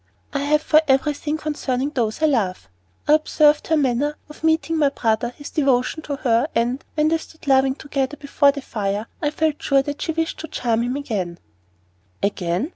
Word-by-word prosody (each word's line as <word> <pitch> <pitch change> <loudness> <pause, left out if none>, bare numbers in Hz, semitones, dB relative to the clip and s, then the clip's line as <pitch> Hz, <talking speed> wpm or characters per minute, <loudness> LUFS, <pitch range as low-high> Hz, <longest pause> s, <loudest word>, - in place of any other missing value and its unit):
"I 280 - 0
have 300 +2 +2
for 310 0 +5
everything 295 +2 +1
concerning 290 -3 -2
those 235 0 -1
I - - +7
love. 200 - 0 0.4
I 295 - +5
observed 305 -1 +3
her 320 - +3
manner 285 +2 +1
of 300 - -13
meeting 320 0 +2
my 290 -2 +4
brother, 235 -3 0
his 290 - -9
devotion 275 +1 +1
to 290 -2 -4
her, 240 0 +2
and, 240 +3 0
when 305 0 +3
they 325 0 +1
stood 320 +1 -14
laughing 265 -1 +3
together 285 -1 -3
before 285 0 +3
the 280 -1 -7
fire, 205 -2 -2 0.2
I 295 - +1
felt 310 0 -1
sure 275 -1 +3
that 290 +1 -5
she - - -1
wished 325 0 -2
to 320 - -6
charm 235 -6 0
him 245 +2 -1
again." 200 -11 -3 0.9
"Again? 195 - -1
280 Hz, 190 wpm, -22 LUFS, 245-300 Hz, 0.9 s, I